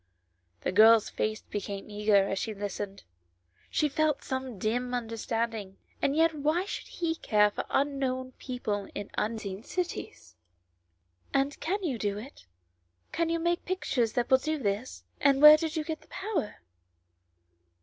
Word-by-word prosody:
The -, -, -1 dB
girl's 220 Hz, +3 st, +6 dB
face 215 Hz, 0 st, -2 dB
became 200 Hz, -1 st, -5 dB
eager 205 Hz, -1 st, +3 dB
as 195 Hz, -, -1 dB
she 220 Hz, -2 st, -3 dB
listened, 200 Hz, 0 st, -5 dB, 0.7 s
she 300 Hz, -, +2 dB
felt 305 Hz, 0 st, 0 dB
some 260 Hz, -4 st, -4 dB
dim 245 Hz, +5 st, -1 dB
understanding, 225 Hz, -3 st, -3 dB, 0.2 s
and 280 Hz, -, +1 dB
yet 325 Hz, +1 st, +4 dB
why 310 Hz, +5 st, 0 dB
should -, -, -5 dB
he 335 Hz, -2 st, -2 dB
care 210 Hz, -9 st, +3 dB
for -, -, -4 dB
un 280 Hz, 0 st, +1 dB
known 255 Hz, -1 st, -2 dB
people 220 Hz, -6 st, -3 dB
in 205 Hz, -, -5 dB
unseen 210 Hz, -3 st, -3 dB
cities? 220 Hz, -, -5 dB, 0.5 s
" 90 Hz, +1 st, -40 dB
And 275 Hz, +1 st, +1 dB
can 390 Hz, +4 st, -2 dB
you 270 Hz, -9 st, -1 dB
do 205 Hz, -1 st, -1 dB
it; 220 Hz, -, -11 dB, 0.6 s
can 335 Hz, 0 st, 0 dB
you 335 Hz, -, +1 dB
make 345 Hz, +1 st, 0 dB
pictures 260 Hz, -, 0 dB
that 245 Hz, +1 st, -1 dB
will 260 Hz, -, +7 dB
do 310 Hz, +3 st, -1 dB
this, 215 Hz, -1 st, -3 dB, 0.2 s
and 275 Hz, -1 st, +4 dB
where 300 Hz, +1 st, +11 dB
did 320 Hz, +1 st, -2 dB
you 315 Hz, -, 0 dB
get 315 Hz, 0 st, -5 dB
the -, -, -21 dB
power?" 385 Hz, -, -3 dB
245 Hz, 160 wpm, -29 LUFS, 205-305 Hz, 0.7 s, where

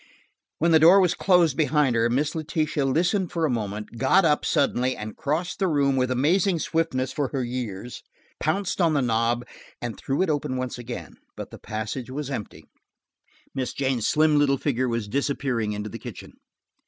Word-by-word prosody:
When 170 Hz, +1 st, +2 dB
the 160 Hz, -, +6 dB
door 170 Hz, +5 st, +7 dB
had 180 Hz, -3 st, +2 dB
closed 175 Hz, -6 st, +4 dB
behind 145 Hz, -3 st, +2 dB
her, 115 Hz, +1 st, +2 dB
Miss 145 Hz, +5 st, 0 dB
Letitia 155 Hz, -2 st, -1 dB
listened 175 Hz, +7 st, +1 dB
for 165 Hz, -2 st, 0 dB
a 150 Hz, -, 0 dB
moment, 105 Hz, 0 st, -4 dB
got 175 Hz, +9 st, +4 dB
up 150 Hz, -2 st, +2 dB
suddenly 130 Hz, -2 st, +1 dB
and 105 Hz, 0 st, -7 dB
crossing 160 Hz, +5 st, -2 dB
the 195 Hz, -, +2 dB
room 140 Hz, -4 st, +2 dB
with 130 Hz, -1 st, +1 dB
amazing 170 Hz, +8 st, +2 dB
swiftness 155 Hz, -6 st, -1 dB
for 145 Hz, -3 st, -1 dB
her 135 Hz, -1 st, -2 dB
years, 120 Hz, -2 st, -5 dB, 0.4 s
pounced 185 Hz, +4 st, -1 dB
on 165 Hz, -3 st, +3 dB
the 140 Hz, -, +2 dB
knob 115 Hz, +1 st, 0 dB, 0.3 s
and 120 Hz, -2 st, -4 dB
threw 135 Hz, +7 st, -1 dB
it 190 Hz, -, -1 dB
open 135 Hz, -3 st, -2 dB, 0.2 s
again. 120 Hz, 0 st, -8 dB, 0.2 s
But -, -, -8 dB
the -, -, -10 dB
passage 110 Hz, +4 st, -5 dB
was 140 Hz, +1 st, -5 dB
empty; 110 Hz, -6 st, -6 dB, 0.9 s
Miss 130 Hz, -2 st, -3 dB
Jane's 130 Hz, -5 st, 0 dB
slim 155 Hz, -1 st, +3 dB
little 140 Hz, -1 st, +3 dB
figure 130 Hz, -2 st, -1 dB
was 115 Hz, -3 st, -2 dB
disappearing 125 Hz, -3 st, -1 dB
into 105 Hz, +1 st, -4 dB
the -, -, -8 dB
kitchen. -, -, -9 dB
135 Hz, 180 wpm, -25 LUFS, 120-155 Hz, 0.9 s, door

